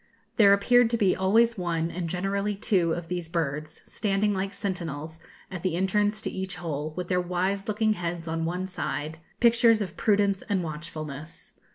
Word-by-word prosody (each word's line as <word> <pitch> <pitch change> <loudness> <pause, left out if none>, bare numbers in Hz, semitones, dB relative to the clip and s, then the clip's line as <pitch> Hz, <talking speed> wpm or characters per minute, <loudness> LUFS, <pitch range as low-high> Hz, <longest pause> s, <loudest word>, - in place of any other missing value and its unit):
There 205 -4 +7
appeared 235 +4 +5
to 235 - 0
be 200 -4 +3
always 225 +4 +3
one, 170 -2 -1
and 175 -1 -4
generally 200 +3 -1
two, 190 -4 +1
of 170 0 -3
these 175 -2 -4
birds, 155 -2 -3
standing, 205 0 0
like 195 0 -2
sentinels, 160 -5 -4 0.3
at 180 -3 -5
the 185 -2 0
entrance 205 +3 +1
to - - -2
each 190 0 -4
hole, 155 -3 -4
with 180 -1 -3
their 180 0 +1
wise 185 +3 -1
looking 215 0 +2
heads 170 -3 -4
on 165 0 -2
one 180 +3 -2
side, 160 -4 -4 0.2
pictures 235 -1 +5
of 190 -4 -4
prudence 200 -2 +2
and 195 -3 +1
watchfulness. 155 -1 -7
185 Hz, 175 wpm, -27 LUFS, 165-200 Hz, 0.3 s, There